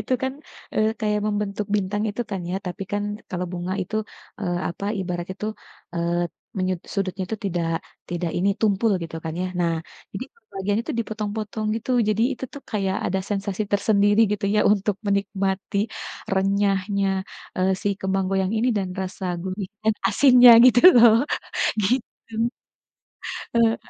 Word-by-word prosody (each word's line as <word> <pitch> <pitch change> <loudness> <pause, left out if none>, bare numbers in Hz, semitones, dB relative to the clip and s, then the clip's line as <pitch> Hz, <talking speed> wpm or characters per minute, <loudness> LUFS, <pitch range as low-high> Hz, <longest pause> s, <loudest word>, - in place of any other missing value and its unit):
itu - - -3
kan, 265 0 0 0.4
eee, 215 0 +3
kayak 210 -1 +1
membentuk 205 -1 -2
bintang, 205 +1 -1
itu 205 +4 -4
kan, 190 -2 -2
ya. 185 - -1
Tapi 180 +2 -4
kan 205 - 0 0.3
kalau 180 0 -2
bunga 180 +1 -3
itu, 215 +4 -4 0.4
eee, 175 -3 -1
apa, 175 +3 -6 0.2
ibaratnya 180 0 -4
itu, 210 - -4 0.5
eee, 170 0 0 0.4
menyut 185 -1 0 0.2
sudutnya 190 -1 -1
itu 220 - -2
tidak 170 -3 -1 0.4
tidak 175 -1 -2
ini, 185 +3 +2
tumpul, 215 0 +3
gitu 165 -1 -6
kan, 160 - -3
ya. - - 0
Nah, 170 -1 +2 0.4
jadi - - -4 0.3
bagian 200 +2 0
itu - - -3
dipotong-potong, 215 -1 -3
gitu. 230 - -5 0.2
Jadi 215 +2 +2
itu - - -5
tuh, 285 - -8
kayak 195 -3 0
ada 190 +2 0
sensasi 200 0 -1
tersendiri, 205 +1 +3
gitu 205 0 -2
ya, 210 - +4
untuk 200 -1 0
menikmati 200 -1 -1 0.6
renyahnya, 195 0 +1 0.5
eee, 185 +1 +2
si - - +1
kembang 190 0 0
goyang 190 0 +1
ini 235 +3 +2
dan 195 -2 -1
rasa 190 0 -5 0.2
gurih 185 +1 -4 0.2
dan 220 0 +3
asinnya, 250 +2 +8
gitu 245 -1 +7 0.2
loh, 235 -1 +8 0.7
gitu. 235 +1 -2 1.2
Heeh. 230 -1 +4
200 Hz, 155 wpm, -24 LUFS, 185-215 Hz, 1.2 s, asinnya